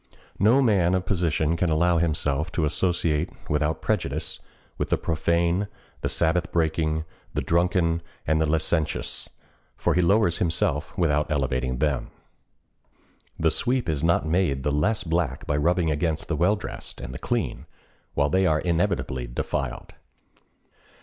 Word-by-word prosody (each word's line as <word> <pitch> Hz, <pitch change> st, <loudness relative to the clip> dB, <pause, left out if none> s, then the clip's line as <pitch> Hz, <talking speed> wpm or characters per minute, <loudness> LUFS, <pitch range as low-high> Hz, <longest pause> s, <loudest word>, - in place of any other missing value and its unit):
No 120 Hz, +8 st, +5 dB
man 95 Hz, -6 st, +3 dB
of 90 Hz, 0 st, -1 dB
position 85 Hz, -4 st, +1 dB
can 85 Hz, +1 st, +1 dB
allow 85 Hz, +2 st, +3 dB
himself 75 Hz, -2 st, 0 dB
to 80 Hz, -, +1 dB
associate, 85 Hz, -1 st, +1 dB, 0.2 s
without 75 Hz, +1 st, 0 dB
prejudice, -, -, -2 dB, 0.4 s
with -, -, -1 dB
the -, -, +2 dB
profane, 85 Hz, +4 st, +1 dB, 0.3 s
the -, -, -1 dB
Sabbath 85 Hz, +1 st, +1 dB
breaking, 80 Hz, -1 st, 0 dB, 0.3 s
the -, -, 0 dB
drunken, 85 Hz, -1 st, +2 dB, 0.2 s
and 80 Hz, +1 st, +2 dB
the 80 Hz, -, +2 dB
licentious; 80 Hz, 0 st, -1 dB, 0.5 s
for -, -, +1 dB
he 90 Hz, -, +3 dB
lowers 90 Hz, -1 st, +3 dB
himself, 80 Hz, -3 st, 0 dB
without 75 Hz, -4 st, +2 dB
elevating 65 Hz, -3 st, 0 dB
them. 70 Hz, -1 st, 0 dB, 1.3 s
The 80 Hz, -1 st, +3 dB
sweep 125 Hz, 0 st, 0 dB
is 80 Hz, -2 st, -1 dB
not 85 Hz, -1 st, +3 dB
made 80 Hz, -5 st, +1 dB
the 75 Hz, -, +1 dB
less 80 Hz, +10 st, +1 dB
black 85 Hz, -1 st, -1 dB
by 75 Hz, -, 0 dB
rubbing 85 Hz, +2 st, +2 dB
against 80 Hz, +1 st, -1 dB
the 85 Hz, -, +1 dB
well 90 Hz, +7 st, +3 dB
dressed 105 Hz, -, -7 dB
and -, -, -7 dB
the 65 Hz, -, -6 dB
clean, 115 Hz, -, -2 dB, 0.5 s
while 70 Hz, 0 st, +2 dB
they 95 Hz, +2 st, +3 dB
are 80 Hz, -3 st, +3 dB
inevitably 85 Hz, -8 st, -1 dB
defiled. -, -, -4 dB
80 Hz, 145 wpm, -25 LUFS, 75-90 Hz, 1.3 s, No